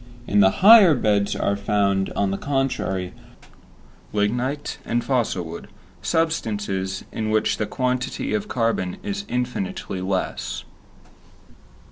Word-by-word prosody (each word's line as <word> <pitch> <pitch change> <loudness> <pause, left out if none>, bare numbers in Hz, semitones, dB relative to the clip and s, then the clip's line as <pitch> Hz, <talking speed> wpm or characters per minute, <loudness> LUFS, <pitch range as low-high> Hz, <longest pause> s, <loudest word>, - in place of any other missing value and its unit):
In 105 - +2
the 95 -1 +7 0.2
higher 205 -7 +9
beds 105 -4 +1
are 100 - 0
found, 100 -1 0
on 100 -1 0
the 100 - -2
contrary, 130 -10 -1 1.0
lignite 120 +7 -1
and 120 +1 -1
fossil 120 -9 0
wood, 80 +1 -8 0.3
substances 105 - -1
in 110 -1 -3
which 110 0 +1
the 105 - -2
quantity 125 0 -2
of 105 -2 -1
carbon 115 -6 -1
is 200 -1 -4
infinitely 120 -6 -3
less. 95 0 -2
105 Hz, 115 wpm, -23 LUFS, 100-125 Hz, 1.0 s, higher